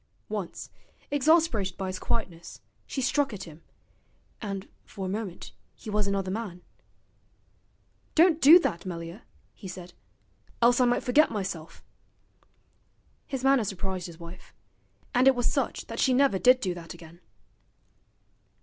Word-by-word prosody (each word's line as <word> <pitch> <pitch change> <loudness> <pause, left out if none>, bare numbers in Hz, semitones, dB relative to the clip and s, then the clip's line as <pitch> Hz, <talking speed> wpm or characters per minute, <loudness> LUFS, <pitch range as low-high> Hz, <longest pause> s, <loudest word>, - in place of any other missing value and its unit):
Once, 205 -5 -5 0.4
exasperated 290 - +2
by 195 - -3
his 185 0 -4
quietness, 175 -7 -4 0.3
she 265 - -3
struck 275 -1 +1
at 195 -2 -6
him, 160 -2 -12 0.8
and 195 -3 -5 0.2
for 195 - -7
a - - -2
moment 195 -2 -5 0.2
he 215 - -8
was 210 -1 +1
another 195 -1 -1
man. 195 -4 -5 1.5
'Don't 330 0 +5
do 305 +6 +10
that, 170 - -1
Melier,' 170 +2 -6 0.3
he 200 - -10
said, 180 -1 -9 0.7
'else 240 +1 +4
I - - +5
might 245 0 +1
forget 295 +5 +4
myself.' 185 -6 -5 1.4
His 270 -2 -4
manner 270 -3 +4
surprised 190 -2 -4
his 170 -1 -12
wife: 170 +2 -12 0.6
and 250 +2 +4
it 270 - +6
was 245 -1 -1
such - - -1
that - - -7
she 260 -2 +3
never 265 -7 +3
did 255 +3 +5
do 185 -5 -1
that 170 -1 -9
again. 170 +1 -14
200 Hz, 140 wpm, -27 LUFS, 180-255 Hz, 1.5 s, do